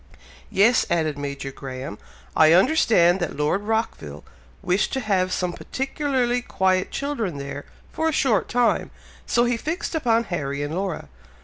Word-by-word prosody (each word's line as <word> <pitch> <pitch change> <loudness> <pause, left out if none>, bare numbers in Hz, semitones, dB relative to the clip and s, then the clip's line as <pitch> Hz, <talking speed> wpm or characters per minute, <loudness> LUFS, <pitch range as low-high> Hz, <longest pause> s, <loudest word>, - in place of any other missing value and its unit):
"Yes," 220 +5 +4
added 160 -3 +1
Major 140 -1 -5
Graham, 135 +2 -7 0.4
"I 155 0 +6
understand 190 - +4
that 175 -5 -3
Lord 150 +6 +1
Rockville 205 - -3 0.4
wished 185 +2 +1
to 265 - 0
have 190 -6 0
some 180 -1 -1
particularly 260 - -1
quiet 190 -5 +1
children 235 - -3
there, 140 +1 -6 0.3
for 320 0 0
a - - 0
short 260 -9 +1
time, 245 0 +1 0.4
so 240 - +3
he 240 -1 +1
fixed 320 +9 -3
upon 235 -7 +2
Harry 145 -7 -3
and 145 +2 -4
Laura! 185 - -3
190 Hz, 145 wpm, -23 LUFS, 155-245 Hz, 0.4 s, I